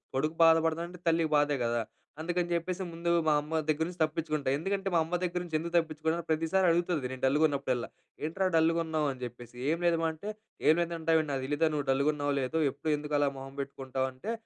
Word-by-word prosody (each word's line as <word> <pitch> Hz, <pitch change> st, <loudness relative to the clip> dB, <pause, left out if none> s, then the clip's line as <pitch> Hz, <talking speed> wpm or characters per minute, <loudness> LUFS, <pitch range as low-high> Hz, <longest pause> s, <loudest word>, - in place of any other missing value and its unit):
కొడుకు 155 Hz, +4 st, 0 dB
బాధపడతడంటే, 165 Hz, +2 st, +2 dB
తల్లికి 165 Hz, -1 st, +3 dB
బాధే 145 Hz, 0 st, +2 dB
కదా! 115 Hz, 0 st, +1 dB, 0.4 s
అందుకని 175 Hz, +1 st, -1 dB
జెప్పేసి, 180 Hz, +2 st, -2 dB
ముందు 170 Hz, +1 st, -1 dB, 0.2 s
మా 155 Hz, -, +5 dB
అమ్మ 160 Hz, +2 st, -2 dB
దగ్గర 155 Hz, +1 st, +2 dB
నుంచి 180 Hz, 0 st, -9 dB
తప్పించుకుంటా. 155 Hz, -3 st, -1 dB
ఎందుకంటే, 195 Hz, +4 st, -2 dB
మా -, -, +5 dB
అమ్మ 165 Hz, +3 st, -3 dB
దగ్గర 180 Hz, 0 st, -1 dB
నుంచి 165 Hz, -3 st, -5 dB
ఎందుకు 170 Hz, +2 st, -5 dB
తప్పించుకున్నా, 160 Hz, 0 st, 0 dB
ప్రతీసారి 165 Hz, +4 st, +2 dB
అడుగుతది, 170 Hz, -5 st, 0 dB
నేను 130 Hz, -1 st, -7 dB
డల్‌గున్నప్పుడెల్లా. 140 Hz, -3 st, +1 dB, 0.4 s
"ఏంట్రా 185 Hz, +4 st, 0 dB
డల్‌గున్నావు?" 160 Hz, -1 st, +2 dB
అని 130 Hz, -, -9 dB
జెప్పేసి. 120 Hz, 0 st, -8 dB
"ఏం 165 Hz, -, +2 dB
లేదమ్మా" 165 Hz, -1 st, +2 dB
అంటే, 180 Hz, +7 st, -7 dB, 0.4 s
"ఏం 155 Hz, -, +8 dB
లేదంటావేంటి? 165 Hz, -2 st, +1 dB
నాకు 135 Hz, -, -1 dB
దెలియదా? 150 Hz, +3 st, +1 dB
నువ్వు 145 Hz, -2 st, -1 dB
డల్‌గున్నావో, 145 Hz, +1 st, +1 dB
లేదో? 130 Hz, +5 st, -1 dB
ఎప్పుడూ 155 Hz, -, -5 dB
ఎందుకలా 145 Hz, -1 st, +1 dB
మొహం 135 Hz, 0 st, -8 dB
బెట్టుకుంటావు" 130 Hz, -1 st, -3 dB
అంటే, 130 Hz, -, -6 dB
160 Hz, 180 wpm, -30 LUFS, 145-170 Hz, 0.4 s, ఏం